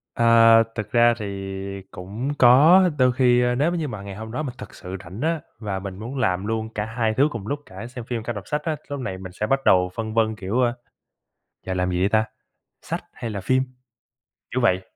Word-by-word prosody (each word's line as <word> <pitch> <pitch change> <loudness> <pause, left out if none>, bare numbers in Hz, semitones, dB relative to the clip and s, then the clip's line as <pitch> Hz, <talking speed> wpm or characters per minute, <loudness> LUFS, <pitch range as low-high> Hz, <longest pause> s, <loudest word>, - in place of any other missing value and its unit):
À, 115 -1 +6
thực 110 -1 -5
ra 120 0 +5
thì 100 -2 -5
cũng 105 +10 -5
có, 155 +10 +7
đôi 130 -1 +4
khi, 125 -1 +3
a, 125 0 +2
nếu 150 +6 +2
m - - -2
như 160 -3 -2
mà 105 -6 -6
ngày 100 -1 -8
hôm 110 +2 -7
đó 150 +6 -3
mình 130 -3 -5
thực - - -10
sự 95 0 -7
rảnh 95 +6 -9
á, 160 0 0 0.2
và 100 -3 -3
mình 95 -1 -7
muốn 120 +6 -6
làm 95 -5 0
luôn 110 0 -2
cả 105 - -1
hai 110 0 -1
thứ 140 +6 +4
cùng 105 -3 -6
lúc, 145 +3 -2
cả 95 +5 -9
xem 120 -2 -8
phim 120 -3 -3
cả 120 - -3
đọc 105 -2 -8
sách 150 0 -1
á, 160 -1 -1
lúc 145 - -4
này 95 -7 -4
mình 95 -1 -9
sẽ 105 +4 -3
bắt 135 +3 +2
đầu 90 0 +4
phân 110 -1 -4
vân, 110 -1 +2
kiểu, 105 +4 -2
ơ, 120 -1 +2 0.9
giờ 95 - -2
làm 90 0 0
gì 90 0 -1
đây 95 - +3
ta? 110 +1 +3 0.6
Sách - - -4
hay 115 - -6
là 100 - -4
phim? 130 +7 +2 0.9
Kiểu 130 - 0
vậy. 95 -5 +3
115 Hz, 235 wpm, -23 LUFS, 100-125 Hz, 0.9 s, có